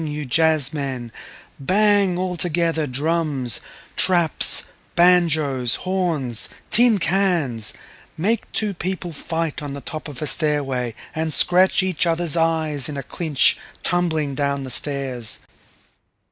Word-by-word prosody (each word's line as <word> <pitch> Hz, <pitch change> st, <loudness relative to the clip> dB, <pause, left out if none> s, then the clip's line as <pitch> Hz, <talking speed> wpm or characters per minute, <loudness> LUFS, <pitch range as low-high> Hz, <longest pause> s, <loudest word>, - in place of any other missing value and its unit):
you 150 Hz, 0 st, -4 dB
jazzmen, 140 Hz, -4 st, 0 dB, 0.5 s
bang 200 Hz, +3 st, +2 dB
altogether 170 Hz, -3 st, -1 dB
drums, 145 Hz, -2 st, 0 dB, 0.4 s
traps, 175 Hz, -5 st, +3 dB, 0.3 s
banjoes, 155 Hz, -8 st, +3 dB
horns, 165 Hz, -, -1 dB, 0.2 s
tin 235 Hz, -2 st, +5 dB
cans—make 175 Hz, -, -2 dB
two 210 Hz, -2 st, -1 dB
people 180 Hz, -1 st, -4 dB
fight 160 Hz, +1 st, -3 dB
on 145 Hz, -2 st, -6 dB
the 140 Hz, -, -6 dB
top 155 Hz, +3 st, -7 dB
of 145 Hz, -4 st, -9 dB
a -, -, -3 dB
stairway 135 Hz, -7 st, -1 dB, 0.2 s
and 160 Hz, 0 st, -2 dB
scratch 185 Hz, +6 st, +4 dB
each 185 Hz, -2 st, 0 dB
other's 165 Hz, -1 st, 0 dB
eyes 160 Hz, -4 st, 0 dB
in 145 Hz, -, -5 dB
a 140 Hz, -, -4 dB
clinch 150 Hz, 0 st, +1 dB, 0.2 s
tumbling 160 Hz, -5 st, +1 dB
down 140 Hz, 0 st, -2 dB
the 130 Hz, -, -4 dB
stairs. 130 Hz, -6 st, -1 dB
155 Hz, 115 wpm, -21 LUFS, 140-175 Hz, 0.5 s, tin